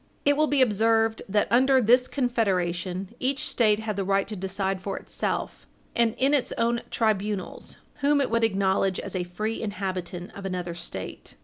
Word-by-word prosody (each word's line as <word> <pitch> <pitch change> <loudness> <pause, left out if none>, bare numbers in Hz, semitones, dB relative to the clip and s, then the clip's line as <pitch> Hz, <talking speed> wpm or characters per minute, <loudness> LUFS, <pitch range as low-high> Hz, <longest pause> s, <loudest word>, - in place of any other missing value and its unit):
It 285 0 +5
will 305 +1 +3
be 285 -3 +4
observed 225 0 +2
that, 205 +1 +2
under 260 +2 +5
this 250 +2 +4
Confederation, 190 -6 -1
each 275 +3 -1
State 215 -3 +2
had 215 -2 -3
the 195 - 0
right 195 +1 +1
to 215 - -4
decide 190 0 -2
for 195 +1 -4
itself, - - -4 0.3
and 230 -1 +2
in 270 +3 +3
its 280 -4 +2
own 235 +1 +1
tribunals, 210 -3 -2 0.2
whom 285 +1 +3
it 275 - 0
would 230 0 +2
acknowledge 195 -3 +1
as - - -6
a 180 - 0
free 215 +6 -3
inhabitant 185 -4 -4
of 200 - -8
another 180 -2 -3
State. 170 0 -8
210 Hz, 175 wpm, -26 LUFS, 190-235 Hz, 0.3 s, It